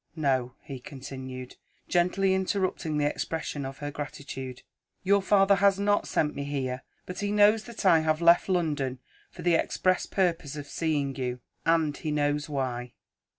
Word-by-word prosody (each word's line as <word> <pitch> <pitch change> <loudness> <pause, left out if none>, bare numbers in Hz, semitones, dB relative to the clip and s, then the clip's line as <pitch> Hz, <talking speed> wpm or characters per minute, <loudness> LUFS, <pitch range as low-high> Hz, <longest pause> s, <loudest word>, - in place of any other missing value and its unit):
No," 130 -5 0
he 135 -3 -7
continued, 130 -1 -8 0.3
gently 190 +2 +2
interrupting 185 -4 -1
the 145 - +2
expression 145 -2 -2
of 135 0 -8
her 145 0 -5
gratitude. 135 -3 -6 0.4
"Your 200 +1 +4
father 195 0 +4
has 200 0 +4
not 205 0 +2
sent 150 -1 +1
me 140 - -4
here 135 -3 -3 0.2
but 180 0 -6
he 205 0 -1
knows 210 +1 +5
that 235 -4 -7
I 170 -4 +7
have 155 0 +1
left 170 +2 +5
London 150 -8 0 0.3
for 175 - -10
the 175 0 +3
express 185 +2 +1
purpose 170 -6 0
of 145 -1 -6
seeing 145 -3 -1
you, 125 -1 -2 0.3
and 160 -3 +3
he 155 - -4
knows 145 0 0
why. 125 -4 -3
150 Hz, 160 wpm, -28 LUFS, 135-185 Hz, 0.4 s, I